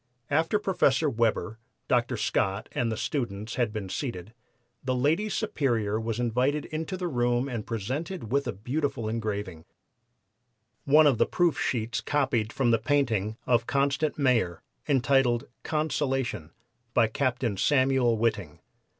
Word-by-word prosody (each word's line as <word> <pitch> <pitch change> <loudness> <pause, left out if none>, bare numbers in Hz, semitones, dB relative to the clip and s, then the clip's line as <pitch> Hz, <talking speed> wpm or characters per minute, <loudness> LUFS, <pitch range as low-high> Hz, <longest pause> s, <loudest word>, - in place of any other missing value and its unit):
After 165 +7 +2
Professor 165 -8 +2
Weber, 115 -3 0 0.3
Dr. - - +1
Scott 95 +2 -1
and 115 -2 -1
the 110 - -3
students 110 -7 -3
had 120 -4 0
been 105 -3 -4
seated 110 - -5 0.5
the 130 -1 0
Lady 160 +12 +1
Superior 120 - 0
was 115 0 -3
invited 125 +5 +1
into 160 +4 -4
the 180 -1 -2
room 120 -3 +1
and 120 -5 -5
presented 130 - -4
with 140 +1 +1
a - - 0
beautiful 120 +3 -2
engraving, 105 -6 -3 1.2
one 150 +2 +6
of 135 -6 +3
the - - +4
proof 175 -3 +1
sheets 120 -1 -1
copied 130 -7 0
from 125 -3 +1
the 115 - +3
painting 115 -5 0
of 120 -2 +2
Constant 140 +2 +1
Mayor, 120 - +1 0.2
entitled 130 -3 +2 0.2
'Consolation,' 135 - -1 0.5
by 120 - +5
Captain 125 -1 -1
Samuel 130 0 +3
Whiting. 105 -9 -1
125 Hz, 135 wpm, -27 LUFS, 110-145 Hz, 1.2 s, one